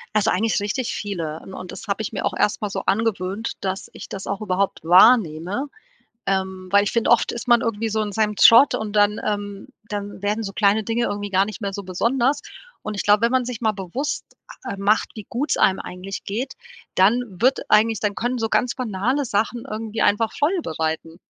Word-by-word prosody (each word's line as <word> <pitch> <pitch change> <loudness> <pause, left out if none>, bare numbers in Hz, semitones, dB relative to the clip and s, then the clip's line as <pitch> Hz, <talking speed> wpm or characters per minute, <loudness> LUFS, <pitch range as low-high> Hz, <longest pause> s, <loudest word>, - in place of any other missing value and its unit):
Also, 215 +1 +3
eigentlich 215 +2 +1
richtig 225 +4 -2
viele 165 -7 -4
un 190 - -11
und 185 -1 -8
das 225 - -9
habe 200 +2 -1
ich 220 - -5
mir 200 - -3
auch - - 0
erst 210 - +1
mal 210 - -2
so 195 0 -4
angewöhnt, 205 0 -1
dass 190 0 -4
ich - - -10
das 195 - -7
auch 200 - -2
überhaupt 195 -1 -1
wahrnehme, 185 - +4 0.6
ähm, 190 -1 -2
weil 200 0 +5
ich - - -1
finde 230 -1 +1
oft 235 - +3
ist 235 +1 -7
man 240 -1 +6
irgendwie 225 -1 -2
so 220 +1 0
in 210 - -4
seinem 210 0 +1
Trott 235 +5 +7
und 215 -1 -3
dann, 205 0 +3
ähm 205 +1 -3 0.2
dann 205 -1 -5
werden 210 +2 0
so 195 -1 -6
kleine 210 +1 +3
Dinge 230 +2 0
irgendwie 205 -2 -3
gar 190 0 +3
nicht 215 +2 -8
mehr 200 -2 -3
so 200 - -4
besonders 240 +9 0 0.4
und 215 - -5
ich - - -1
glaube, 205 0 +4
wenn 235 - +3
man 255 -1 +2
sich 245 -2 -5
mal 220 -2 +2
bewusst, 205 +9 -4 0.4
a - - -5
ähm, 200 - -7
macht, 210 +2 +2
wie 215 - -7
gut 275 +6 -2
es - - +1
einem 190 - +3
eigentlich 185 +2 -7
geht, 240 +7 -4 0.4
dann 205 +6 +4 0.2
wird 260 +2 +4
eigentlich 220 0 +4
dann 205 -1 -1
können 245 +4 -2
so 225 -1 -1
ganz 245 +2 +1
banale 250 +4 -1
Sachen 225 +2 -1
irgendwie 220 0 -4
einfach 215 +2 +2
Freude 335 +4 0
bereiten. 160 - -3
210 Hz, 215 wpm, -22 LUFS, 195-230 Hz, 0.6 s, Trott